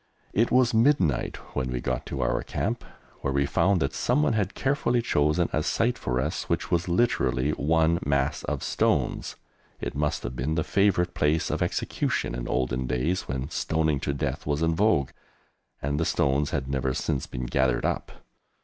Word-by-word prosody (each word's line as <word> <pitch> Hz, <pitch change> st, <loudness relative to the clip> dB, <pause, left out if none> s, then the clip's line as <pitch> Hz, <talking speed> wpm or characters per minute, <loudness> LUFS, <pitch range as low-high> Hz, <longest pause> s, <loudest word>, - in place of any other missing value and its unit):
It 115 Hz, +3 st, +3 dB
was 125 Hz, -1 st, +3 dB
midnight 110 Hz, -, +2 dB, 0.2 s
when 65 Hz, -1 st, -1 dB
we 60 Hz, -, -2 dB
got 65 Hz, 0 st, -3 dB
to -, -, -3 dB
our -, -, +1 dB
camp, -, -, -2 dB, 0.4 s
where 70 Hz, -, -2 dB
we 70 Hz, +1 st, +2 dB
found 95 Hz, +6 st, +2 dB
that 70 Hz, -, -1 dB
someone 75 Hz, +5 st, +2 dB
had 105 Hz, -3 st, -1 dB
carefully 135 Hz, -3 st, +1 dB
chosen 75 Hz, -5 st, +2 dB
a 75 Hz, -, +2 dB
site 120 Hz, +9 st, +1 dB
for 65 Hz, -, -2 dB
us 65 Hz, -, -2 dB
which -, -, -1 dB
was 85 Hz, 0 st, +1 dB
literally 85 Hz, -, +1 dB
one 80 Hz, +3 st, +2 dB
mass 70 Hz, 0 st, 0 dB
of -, -, -3 dB
stones. -, -, 0 dB, 0.4 s
It -, -, -4 dB
must 75 Hz, +2 st, -1 dB
have -, -, -5 dB
been 70 Hz, +6 st, -1 dB
the 80 Hz, -, +1 dB
favourite 95 Hz, -3 st, +2 dB
place 75 Hz, +2 st, +1 dB
of -, -, -2 dB
execution -, -, -1 dB
in -, -, -4 dB
olden 65 Hz, 0 st, -1 dB
days 70 Hz, +9 st, -1 dB
when 65 Hz, +3 st, -3 dB
stoning 80 Hz, -2 st, 0 dB
to 70 Hz, -, -1 dB
death 70 Hz, -, -3 dB
was 75 Hz, +2 st, 0 dB
in 80 Hz, 0 st, +2 dB
vogue, 85 Hz, -7 st, +2 dB, 0.7 s
and 70 Hz, +1 st, 0 dB
the 80 Hz, -, +1 dB
stones 70 Hz, +1 st, +1 dB
had 70 Hz, -4 st, -2 dB
never 65 Hz, -1 st, -1 dB
since 65 Hz, -, -2 dB
been 60 Hz, 0 st, -5 dB
gathered 65 Hz, 0 st, +1 dB
up! -, -, -2 dB
75 Hz, 180 wpm, -26 LUFS, 65-90 Hz, 0.7 s, It